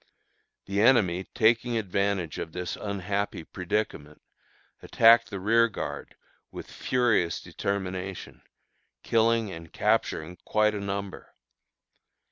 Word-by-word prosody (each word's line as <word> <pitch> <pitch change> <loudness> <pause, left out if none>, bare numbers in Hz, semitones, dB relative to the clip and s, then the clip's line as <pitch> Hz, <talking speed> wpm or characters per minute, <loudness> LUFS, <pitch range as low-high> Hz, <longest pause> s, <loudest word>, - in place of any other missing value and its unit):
The 100 +1 -1
enemy, 95 -7 +3
taking 115 +1 +2
advantage 100 -4 -1
of 80 - -6
this 90 -1 -4
unhappy 100 -2 -3
predicament, 85 -4 -4 0.6
attacked 115 0 +5
the 100 -3 -5
rearguard 115 +2 0 0.3
with - - -10
furious 120 -10 +1
determination, 95 -1 -5 0.6
killing 115 -2 +2
and 80 -2 -10
capturing 80 +3 0
quite 105 0 +1
a 105 - -3
number. 100 0 -6
100 Hz, 95 wpm, -27 LUFS, 90-110 Hz, 0.6 s, attacked